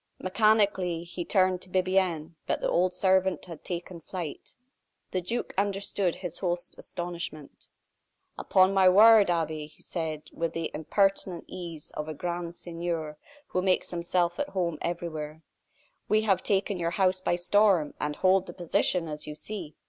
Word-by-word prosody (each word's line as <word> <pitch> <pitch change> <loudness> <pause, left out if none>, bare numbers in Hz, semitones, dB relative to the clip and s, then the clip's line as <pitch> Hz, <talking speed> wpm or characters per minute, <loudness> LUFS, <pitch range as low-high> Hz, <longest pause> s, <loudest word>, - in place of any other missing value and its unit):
Mechanically, 195 -4 +2
he 175 +1 -6
turned 185 -1 +2
to 185 - -8
Bibiaine, 185 -3 +1
but - - 0
the - - -1
old 180 +1 +2
servant 190 -1 +2
had 165 -4 -10
taken 175 0 -5
flight. 170 -2 -7 0.6
The 185 - -1
duke 230 +8 -3
understood 200 -2 0
his 175 -3 -3
host's 175 -2 -2
astonishment. 170 -4 -6 0.7
"Upon 190 0 +3
my 190 -1 +6
word, 215 +1 +7
Abbe!" 160 -3 -1
he 150 - -20
said, 160 -3 -4
with 165 -1 -2
the 165 -1 -3
impertinent 190 +2 0
ease 170 -4 -8
of 150 +1 -5
a 155 - -5
grand 175 +1 -4
seigneur 165 -3 -4 0.3
who 185 - 0
makes 185 -1 +1
himself 175 0 0
at 290 0 -1
home 175 - -2
everywhere, 160 -2 -4 0.7
"we 215 0 +3
have 195 -4 +2
taken 200 -1 0
your 170 -1 0
house 185 -1 +2
by 175 - +1
storm, 180 -3 +3
and 150 0 -1
hold 190 +2 +3
the - - -7
position, 175 0 +1
as 150 -1 -6
you 150 - -6
see. 170 -1 -6
175 Hz, 155 wpm, -28 LUFS, 165-190 Hz, 0.7 s, word